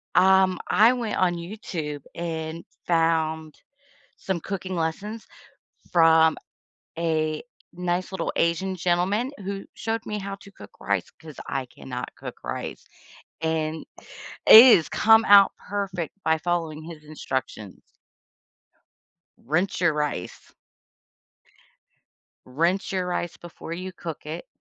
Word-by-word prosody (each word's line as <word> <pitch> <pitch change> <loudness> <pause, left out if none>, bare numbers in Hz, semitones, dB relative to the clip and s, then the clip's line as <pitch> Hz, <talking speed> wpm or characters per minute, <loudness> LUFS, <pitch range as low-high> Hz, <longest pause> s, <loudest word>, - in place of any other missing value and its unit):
Um, 190 -1 +5
I 225 +4 +5
went 235 -4 -3
on 180 -2 +2
YouTube 170 -5 -6
and 165 -1 -4 0.2
found 160 -2 +1 0.6
some 190 -3 -3
cooking 190 0 -5
lessons 200 +7 -3 0.7
from 160 -1 +5 0.6
a 155 -2 -1 0.3
nice 180 +1 -2
little 190 - -2
Asian 185 +3 0
gentleman 185 +8 0
who 195 0 -4
showed 225 0 -3
me 210 - -3
how 200 0 -5
to 200 0 -16
cook 100 - -13
rice 100 -3 -1
'cause 155 -3 -11
I 135 -1 -2
cannot 125 0 -8
cook - - -10
rice, - - -5 0.6
and 160 -1 -2 0.6
it 235 +2 +11
has 160 - -2
come 220 +1 +5
out 200 -1 +7
perfect 195 -5 -4
by 160 0 +2
following 165 -2 -2
his 160 -1 -10
instructions. 130 -9 -5 1.6
Rinse 175 +8 -1
your 170 -3 +3
rice. 150 -12 -4 2.0
Rinse 170 +9 0
your 185 -1 -1
rice 175 -1 -3
before 170 -1 -9
you 185 +2 -6
cook 170 -4 -8
it, 160 +3 -6
170 Hz, 115 wpm, -25 LUFS, 160-190 Hz, 2.0 s, it